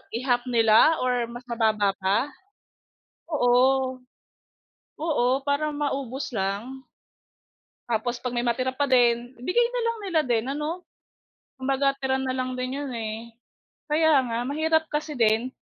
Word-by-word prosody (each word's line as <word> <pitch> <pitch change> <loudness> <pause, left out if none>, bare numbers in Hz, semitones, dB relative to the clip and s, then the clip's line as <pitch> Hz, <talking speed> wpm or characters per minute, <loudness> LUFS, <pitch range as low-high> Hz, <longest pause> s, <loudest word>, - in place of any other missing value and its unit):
i-half 245 0 +1
nila 230 +6 +5
or 245 -2 0
mas 240 +1 -9
mababa 215 -4 +1
pa? 195 +1 +2 1.1
Oo. 260 -1 +3 1.0
Oo, 305 -5 0 0.2
para 285 +2 +1
maubos 275 -2 -3
lang. 220 +7 -3 1.0
Tapos 240 +2 -1
'pag 250 -1 -3
may 240 - 0
matira 255 +2 0
pa 285 +2 -1
din, 245 -1 +2
ibigay 470 - +2
na - - -1
lang 465 0 -1
nila 345 -5 +1
din 240 -5 0
ano? 315 +5 -4 0.7
Kumbaga 275 +1 +1
tira 265 -1 0
na 265 - -2
lang 255 0 -2
din 255 +2 -3
'yon, 285 -2 -4
eh. 225 0 -5 0.6
Kaya 310 -2 +4
nga, 230 0 -1
mahirap 315 +3 +1
kasi 300 0 -3
din. 225 +2 +2
255 Hz, 135 wpm, -25 LUFS, 235-290 Hz, 1.1 s, nila